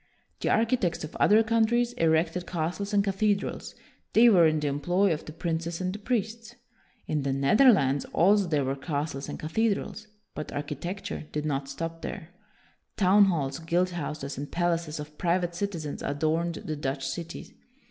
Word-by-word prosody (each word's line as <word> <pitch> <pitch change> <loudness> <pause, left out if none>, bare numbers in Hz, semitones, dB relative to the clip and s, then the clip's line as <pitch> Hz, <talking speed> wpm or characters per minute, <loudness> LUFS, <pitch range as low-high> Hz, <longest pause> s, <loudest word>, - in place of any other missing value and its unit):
The - - -1
architects 225 -8 +1
of 155 - -7
other 215 +2 +5
countries 230 +2 +2
erected 165 +1 +1
castles 180 +4 -3
and 200 -1 +3
cathedrals; 200 +1 -1 0.4
they 235 +2 +7
were 175 -6 +6
in 155 0 +1
the 150 - -1
employ 175 +7 +1
of 155 - -6
the - - -8
princes 165 +1 -3
and 185 0 -2
the 210 - -6
priests. 230 +1 -3 0.5
In 150 -1 -1
the 135 0 -1
Netherlands 140 - +4
also 200 +2 +3
there 150 -4 +1
were 135 +1 -1
castles 140 0 -4
and - - -5
cathedrals, 215 +5 -1 0.3
but 150 - -6
architecture 150 +5 -5
did 150 0 -3
not 135 -2 -2
stop 165 +4 -5
there. 160 - -6 0.7
Town 200 +1 +6
halls, 145 -7 -1
guild 175 +3 0
houses, 150 -4 -5
and 145 - -6
palaces 170 -3 -1
of 150 0 -9
private 175 0 +1
citizens 170 -5 -4
adorned 160 +4 -1
the 155 - -5
Dutch 135 -2 -3
cities. 165 +5 -6
170 Hz, 160 wpm, -27 LUFS, 150-200 Hz, 0.7 s, they